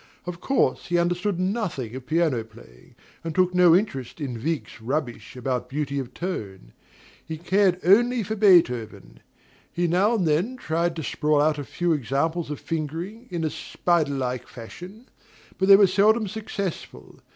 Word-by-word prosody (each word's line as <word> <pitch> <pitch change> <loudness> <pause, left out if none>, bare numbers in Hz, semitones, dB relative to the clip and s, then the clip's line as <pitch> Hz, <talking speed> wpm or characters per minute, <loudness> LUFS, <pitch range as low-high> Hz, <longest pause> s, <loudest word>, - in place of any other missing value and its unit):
Of 175 -1 -6
course 270 - +1
he 175 - +1
understood 175 +2 0
nothing 185 - -2
of 130 -1 -8
piano 155 -8 +1
playing, 110 - -18 0.3
and 165 -1 -5
took 185 -1 +3
no 180 -2 +6
interest 150 - -2
in 125 -6 -5
Wieck's 160 -6 -3
rubbish 130 0 -4
about 125 0 -3
beauty 140 0 -2
of 130 -2 -6
tone; 100 - -6 0.5
he 160 0 -6
cared 185 +2 +2
only 235 +6 +4
for 220 +3 -3
Beethoven. 125 - +2 0.5
He 175 - -1
now 190 +7 +2
and 185 -7 0
then 180 +12 0
tried 170 -5 -1
to 160 - -5
sprawl 150 +1 +1
out 150 0 +2
a - - -3
few 175 +4 -1
examples 150 +5 -1
of 150 - -5
fingering, 165 - -5
in 170 -3 -3
a 155 - -1
spider 165 -5 0
like 125 -2 -3
fashion; 180 - -11 0.5
but 190 - +2
they 195 - +10
were 200 0 +7
seldom 210 +4 +3
successful. 200 -3 -6
165 Hz, 165 wpm, -24 LUFS, 140-190 Hz, 0.5 s, they